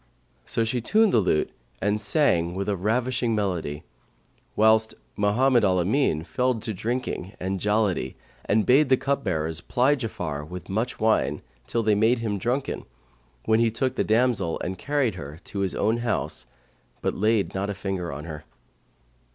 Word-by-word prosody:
So 115 - +1
she 115 +2 -1
tuned 215 - +3
the - - +5
lute 90 -6 +1 0.3
and 105 +2 0
sang 95 - +2
with 95 +1 -3
a 105 - +1
ravishing 120 +4 0
melody; 90 -8 -2 0.7
whilst 110 +1 +4 0.2
Mohammed 120 +4 +3
al 95 -2 +3
Amin 90 - +1
fell 125 +7 0
to 110 0 -4
drinking 110 -2 -3
and 95 +1 -2
jollity 105 - 0 0.3
and 105 +1 +2
bade 135 +3 +5
the 130 - +5
cupbearers 85 - -1
ply 130 +4 +2
Ja'afar 85 - -4
with 90 0 -8
much 110 +6 -2
wine, 110 0 +1 0.2
till 115 - 0
they 110 -1 +3
made 110 +4 +3
him 110 -3 -2
drunken, 125 +6 -2 0.6
when 110 0 +3
he 115 0 +4
took 125 +3 -1
the - - 0
damsel 115 -6 +1
and 95 +1 -4
carried 145 -6 0
her 75 -3 -8
to 100 - -6
his 95 -2 -1
own 110 +2 +1
house, 120 0 -2 0.6
but - - +1
laid 105 0 +1
not 95 +1 -2
a 100 - -3
finger 95 -3 -3
on 75 +2 -6
her. 75 -2 -7
110 Hz, 165 wpm, -25 LUFS, 95-120 Hz, 0.7 s, the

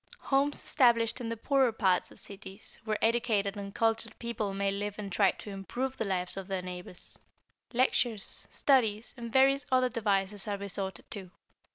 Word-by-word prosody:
= - - -32
Homes 280 +2 +5
established 235 -3 +3
in 230 - -3
the 230 - -3
poorer 265 +1 +3
parts 190 -5 +2
of - - -16
cities, 195 0 -10
where 215 -1 0
educated 220 -4 +1
and 200 -1 -6
cultured 225 0 +1
people 235 -4 -3
may 195 0 0
live 205 +1 -3
and 205 -2 -5
try 195 +1 +4
to 205 - -6
improve 245 +7 -3
the 225 - -2
lives 185 -1 -2
of 195 -1 -5
their 190 -2 -2
neighbors. 180 -1 -7 0.5
Lectures, 240 -4 0
studies, 230 -5 +2
and 235 -2 -7
various 270 +2 +4
other 255 -1 +4
devices 205 -3 0
are 205 -1 -1
resorted 195 -2 -4
to. 195 -4 -7
210 Hz, 175 wpm, -30 LUFS, 195-240 Hz, 0.5 s, Homes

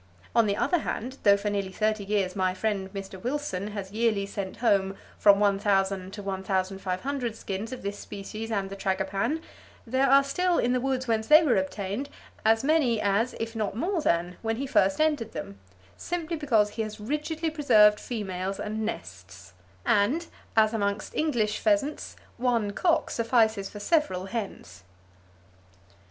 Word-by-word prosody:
On 230 -2 +5
the 200 0 0
other 355 - +2
hand, 260 -2 -4
though 200 -1 +6
for 205 +1 -2
nearly 200 -2 -2
thirty 215 +1 0
years 195 -2 0
my 185 -1 0
friend 195 -2 -2
Mr. 195 -2 -8
Wilson 245 -7 -2
has 200 -2 -6
yearly 215 -2 +1
sent 200 -1 -5
home 195 -4 +2 0.2
from 200 -1 +6
1,000 195 -2 +1
to 205 - -7
1,500 195 +6 -2
skins 205 +2 -5
of 255 - -7
this 200 0 -4
species 215 +2 -7
and 200 -3 -2
the - - -5
tragopan, 195 +10 -1 0.4
there 260 +3 +2
are 275 +1 +7
still 360 +5 +1
in 245 - +2
the 250 - +1
woods 260 -1 -1
whence 220 -1 0
they 310 +2 +8
were 280 -6 +3
obtained 200 +7 -3 0.3
as 225 +2 +3
many 275 -7 +3
as, 210 +4 +1
if 225 0 -4
not 210 -3 -2
more 350 - 0
than, 175 - 0
when 225 0 -1
he 270 +4 -3
first 195 -6 +2
entered 295 -8 +1
them, 100 -11 -7 0.4
simply 340 -1 -3
because 230 -9 +2
he 225 - -3
has 215 0 -5
rigidly 300 +7 -2
preserved 215 -9 +5
females 195 -4 -4
and 215 +1 -3
nests, 95 - -7 0.3
and 255 +12 +2 0.3
(as 215 0 +5
amongst 200 -1 -2
English 235 -9 0
pheasants) 300 -2 0 0.2
one 235 -4 +1
cock 335 - +1
suffices 225 -4 +2
for 205 - -9
several 205 - +1
hens." 195 - -6
215 Hz, 160 wpm, -27 LUFS, 195-255 Hz, 0.4 s, they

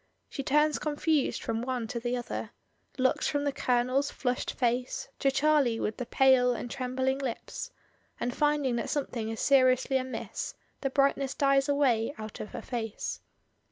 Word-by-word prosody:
She - - -4
turns 300 +3 +2
confused 305 -1 0
from 225 0 -1
one 250 -1 -2
to 235 - -3
the 240 +1 -1
other; 240 - -4 0.5
looks 260 0 +2
from 290 -1 0
the 285 - +1
Colonel's 255 +2 +1
flushed 250 -1 -2
face 245 0 -1
to 275 - +3
Charlie 270 -4 +3
with 210 - -2
the 250 - -4
pale 260 -2 +5
and 240 - -5
trembling 260 0 -1
lips, 270 - -4 0.5
and 245 +1 -2
finding 295 -4 +2
that - - -2
something 245 -6 -2
is 225 - -4
seriously 260 -1 +4
amiss, 260 0 -4 0.2
the 270 - -1
brightness 275 0 +1
dies 275 0 +3
away 270 -4 +2
out 215 -1 -7
of - - -5
her - - -7
face. 225 -3 -4
260 Hz, 160 wpm, -29 LUFS, 245-280 Hz, 0.5 s, pale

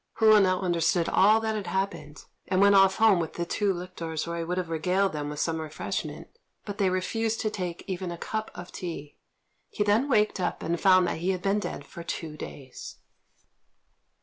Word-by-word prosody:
Hou 215 -1 +6
now 185 -2 +3
understood 170 -1 +1
all 215 +3 +5
that 220 0 -1
had 210 -4 -4
happened, 170 -6 -3 0.2
and 185 -1 +1
went 200 +1 +6
off 195 -1 +6
home 220 -4 +5
with 165 -2 -3
the 170 - -3
two 205 +3 0
lictors 170 -3 -4
where 170 0 -4
he - - -2
would 180 +2 -3
have 175 -2 -3
regaled 180 +4 +1
them 145 -1 -3
with 150 0 -6
some 160 0 -1
refreshment, 155 -1 -5 0.4
but 205 -1 -6
they 195 -2 +3
refused 225 +5 -1
to 215 - -1
take 180 -4 -4
even 185 -2 -4
a 170 - -6
cup 220 +5 -4
of 175 0 -9
tea. 160 -5 -7 0.5
He 205 - -1
then 215 +7 +2
waked 210 -5 +2
up 180 - -2
and 170 +1 -2
found 185 -1 +6
that 170 - -2
he 175 +3 -1
had 185 -1 -1
been 200 +1 +2
dead 145 -8 -5
for 170 - -10
two 165 -2 -5
days. 135 -3 -9
185 Hz, 205 wpm, -27 LUFS, 165-200 Hz, 0.5 s, Hou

